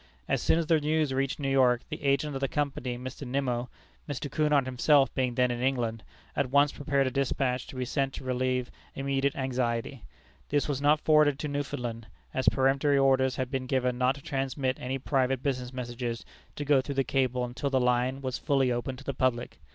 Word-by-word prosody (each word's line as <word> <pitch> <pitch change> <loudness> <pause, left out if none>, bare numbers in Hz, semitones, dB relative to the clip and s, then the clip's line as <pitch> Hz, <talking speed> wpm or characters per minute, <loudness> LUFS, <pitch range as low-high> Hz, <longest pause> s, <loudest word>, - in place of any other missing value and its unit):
As - - 0
soon - - +3
as 165 - 0
the 160 0 +3
news 155 -2 +1
reached 135 0 0
New 140 - -2
York, 125 -3 +4
the - - -6
agent 140 +1 +1
of 135 - -4
the 135 - +1
Company, 135 -4 -2
Mr. 130 +3 -8
Nimmo 125 -2 -1 0.4
(Mr. 145 0 -4
Cunard 150 -3 +2
himself 135 +1 +3
being 125 -2 0
then 125 -1 +2
in 120 0 -3
England), 120 -4 0 0.3
at 130 - 0
once 140 +2 +4
prepared 140 -1 0
a 130 - -1
despatch 130 -1 -1
to - - -10
be 130 0 -2
sent 135 +1 -1
to - - -7
relieve 130 0 -1 0.2
immediate 135 0 0
anxiety. 125 -1 -2 0.5
This 145 -1 +1
was 140 -2 -2
not 150 +1 +4
forwarded 150 -2 +4
to 150 - -3
Newfoundland, 125 -6 -4 0.3
as 130 - +3
peremptory 135 +2 +2
orders 130 -1 +3
had 130 -1 -3
been 130 -2 -2
given 125 -1 0
not 130 +1 +3
to 140 - -12
transmit 135 -2 -2
any 130 +2 -2
private 130 -1 0
business 125 -3 -2
messages 120 -2 -4 0.3
to 145 - -4
go 140 -2 +4
through 140 +2 -5
the 135 - +2
cable 130 -2 0
until 125 +4 -3
the 135 -1 +2
line 125 +2 +1
was 130 0 -3
fully 135 -4 +2
open 120 +2 -3
to 135 - -11
the 140 - -3
public. 125 -6 -1
130 Hz, 205 wpm, -28 LUFS, 125-140 Hz, 0.5 s, York